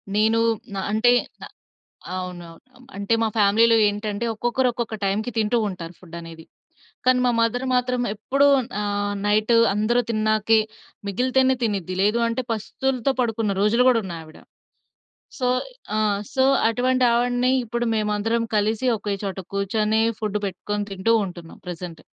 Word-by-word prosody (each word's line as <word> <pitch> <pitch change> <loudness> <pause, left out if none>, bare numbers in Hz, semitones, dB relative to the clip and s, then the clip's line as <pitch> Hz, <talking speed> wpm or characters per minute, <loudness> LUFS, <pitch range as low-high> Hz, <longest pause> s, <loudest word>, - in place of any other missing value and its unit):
నేను 220 +2 +3 0.4
న - - -4
అంటే 220 +3 +4 0.3
న - - -8 0.7
అవునవును. 175 -2 -7 0.2
అం 255 - -18
అంటే 200 +3 0
మా 225 - +2
ఫ్యామిలీలో 225 +3 +5
ఏంటంటే 205 +1 -3
ఒక్కొక్కరు, 240 +3 0
ఒక్కొక్క 235 -2 -4
టైమ్‌కి 210 +5 -1
తింటూ 220 +2 +1
ఉంటారు 180 -3 -7
ఫుడ్డనేది. 165 -2 -10 0.6
కానీ, 255 0 +4
మా 245 - +3
మదర్ 230 +3 0
మాత్రం 250 0 0
ఎప్పుడూ 275 +6 +1 0.4
ఆహ్, 205 0 -1
నైటు 215 +3 +2 0.2
అందరు 215 +4 +2
తిన్నాకే 215 0 +2 0.5
మిగిలితేనే 260 +5 +2
తినిద్ది. 195 -5 -2
లేదు 210 +4 +2
అంటే, 230 +2 -1
పస్తులతో 250 +4 -1
పడుకున్న 225 -4 0
రోజులు 230 +5 +3
గూడా 245 -3 +4
ఉన్నయి 170 -3 -6
ఆవిడ. 155 0 -15 1.0
సో 250 - 0 0.5
ఆ! - - +1 0.4
సో, 265 - +2 0.3
అటువంటావిడిని 245 0 +2
ఇప్పుడు 235 +1 -2
మేమందరం 215 +2 0
కలిసి 215 +4 0
ఒకే 205 -1 -3
చోట 195 -1 -4 0.2
కూర్చొని, 215 +2 +1 0.2
ఫుడ్డు 210 -1 -1
పెట్టుకొని 205 +2 -3
తింటూ 195 +4 0
ఉంటున్నాం 175 -3 -10
ప్రెజెంట్. 175 -1 -7
215 Hz, 135 wpm, -23 LUFS, 200-240 Hz, 1.0 s, ఫ్యామిలీలో